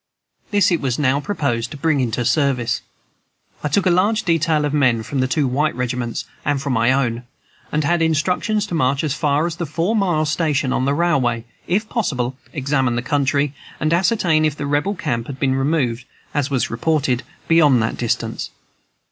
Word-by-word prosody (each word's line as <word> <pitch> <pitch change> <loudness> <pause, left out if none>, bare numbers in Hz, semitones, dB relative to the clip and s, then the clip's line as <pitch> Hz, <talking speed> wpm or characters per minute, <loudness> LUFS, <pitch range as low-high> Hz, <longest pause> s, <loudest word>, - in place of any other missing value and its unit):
This 205 -4 +3
it 170 - +1
was 130 -3 -1
now 140 -1 +2
proposed 140 - -2
to 145 - -8
bring 155 0 +1
into 120 -1 -1
service. 125 -2 +1 0.8
I - - +1
took 190 +7 +1
a 185 - +4
large 205 +5 +2
detail 160 -3 +2
of 145 - -2
men 125 -6 +2
from 135 +5 -3
the 130 - +2
two 140 +1 +1
white 145 +5 0
regiments 125 -1 -3 0.2
and 145 -1 0
from 140 -1 -2
my 115 0 +3
own, 125 -3 0 0.4
and 150 0 0
had 170 +3 +1
instructions 180 +7 +1
to 205 - -7
march 140 -3 +1
as 150 -3 0
far 150 0 +1
as 170 -1 -3
the 170 -3 -3
four 170 +8 0
mile 175 -7 +1
station 150 -4 0
on 130 - 0
the 140 +1 +1
railway, 130 -9 +1 0.2
if 210 +5 0
possible, 135 - -1 0.2
examine 135 -4 0
the 120 - -2
country, 140 +1 +1 0.3
and 155 +1 +1
ascertain 175 -4 +2
if 155 -2 +1
the 145 - -4
Rebel 145 +8 0
camp 120 -9 -2
had 135 -1 -7
been 135 -2 +2
removed, 135 -3 0 0.3
as 145 -2 0
was 130 -2 0
reported, 145 -7 0 0.3
beyond 150 -6 +5
that 110 - -1
distance. 120 -2 -2
145 Hz, 190 wpm, -20 LUFS, 130-165 Hz, 0.8 s, beyond